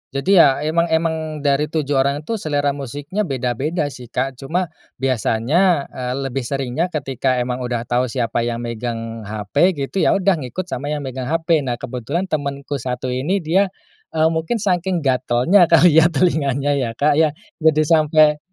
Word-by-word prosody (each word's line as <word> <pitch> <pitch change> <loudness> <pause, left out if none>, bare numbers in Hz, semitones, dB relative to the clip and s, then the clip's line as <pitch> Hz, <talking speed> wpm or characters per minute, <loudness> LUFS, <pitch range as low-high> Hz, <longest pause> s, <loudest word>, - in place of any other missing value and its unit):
Jadi 180 +7 +3
ya 140 -1 +5
emang 170 +2 +1
emang 160 -2 -1
dari 145 +1 +2
7 150 -2 -3
orang 140 +2 0
itu 225 +5 -3
selera 145 -3 0
musiknya 145 - -4
beda-beda 140 +4 -2
sih, 125 -3 -11
Kak. 130 +1 -3
Cuma 160 +4 -2 0.2
biasanya, 135 - +1
eee, 125 -1 -4
lebih 135 -2 -3
seringnya 135 +5 -1
ketika 135 -5 -1
emang 125 0 -3
udah 120 -2 -2
tahu 125 +1 0
siapa 115 -1 -1
yang 120 0 -3
megang 115 -2 -5
HP, 110 - +1
gitu, 140 +7 -3
ya - - +3
udah 195 -3 +2
ngikut 140 +8 -4
sama 145 -6 -5
yang 150 -1 -3
megang 130 -1 -5
HP. 165 0 +1
Nah, 125 -4 -2
kebetulan 130 +8 -4
temanku 140 -1 -3
satu 125 +1 -3
ini, 165 +9 -1
dia, 190 +5 +2 0.5
eee, 160 +1 +3
mungkin 160 +8 -1
saking 180 -3 0
gatalnya 130 +7 +3
kali 165 -1 +6
ya 160 - +5
telinganya, 145 -4 +1
ya, 115 -3 -3
Kak, 150 +2 +2
ya. 155 -2 +2 0.2
Jadi 155 -1 +3
sampai 155 -1 +4
145 Hz, 170 wpm, -20 LUFS, 125-160 Hz, 0.5 s, kali